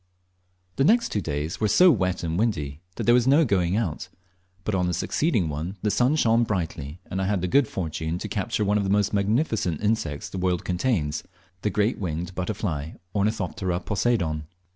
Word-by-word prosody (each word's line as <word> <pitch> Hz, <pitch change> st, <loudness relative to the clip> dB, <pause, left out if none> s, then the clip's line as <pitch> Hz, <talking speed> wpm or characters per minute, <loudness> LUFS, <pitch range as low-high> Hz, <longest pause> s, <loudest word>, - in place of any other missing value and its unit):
The 135 Hz, -, +3 dB
next 235 Hz, -, +4 dB
two 105 Hz, -, 0 dB
days 75 Hz, +3 st, -3 dB
were 110 Hz, -, +3 dB
so 180 Hz, -, +6 dB
wet 95 Hz, -, 0 dB
and 80 Hz, -1 st, -1 dB
windy 80 Hz, -9 st, -1 dB
that -, -, -3 dB
there 120 Hz, -, +5 dB
was 125 Hz, 0 st, +4 dB
no 145 Hz, +4 st, +5 dB
going 95 Hz, -4 st, +1 dB
out; 100 Hz, -9 st, -2 dB, 0.5 s
but 105 Hz, -, -2 dB
on 90 Hz, -2 st, +1 dB
the 90 Hz, -, 0 dB
succeeding 115 Hz, -, +1 dB
one 80 Hz, +6 st, -4 dB
the 105 Hz, -, +2 dB
sun 125 Hz, +7 st, +3 dB
shone 115 Hz, -5 st, +3 dB
brightly, 85 Hz, -7 st, -3 dB
and 95 Hz, -, -3 dB
I 95 Hz, -, 0 dB
had 100 Hz, -2 st, 0 dB
the -, -, +1 dB
good 135 Hz, +7 st, +4 dB
fortune 80 Hz, -2 st, -3 dB
to -, -, -5 dB
capture 105 Hz, +2 st, -1 dB
one 105 Hz, +1 st, +2 dB
of -, -, 0 dB
the 95 Hz, -, -1 dB
most 105 Hz, +1 st, +2 dB
magnificent 105 Hz, -, +1 dB
insects 105 Hz, -9 st, -1 dB
the 95 Hz, -, -6 dB
world 90 Hz, -1 st, 0 dB
contains, 90 Hz, -, 0 dB, 0.4 s
the 105 Hz, -, 0 dB
great 105 Hz, +3 st, +1 dB
bird -, -, -11 dB
winged 85 Hz, 0 st, -3 dB
butterfly, 90 Hz, -5 st, -3 dB, 0.2 s
Ornithoptera 100 Hz, -3 st, -1 dB
Poseidon. 90 Hz, -8 st, 0 dB
95 Hz, 195 wpm, -25 LUFS, 85-110 Hz, 0.5 s, so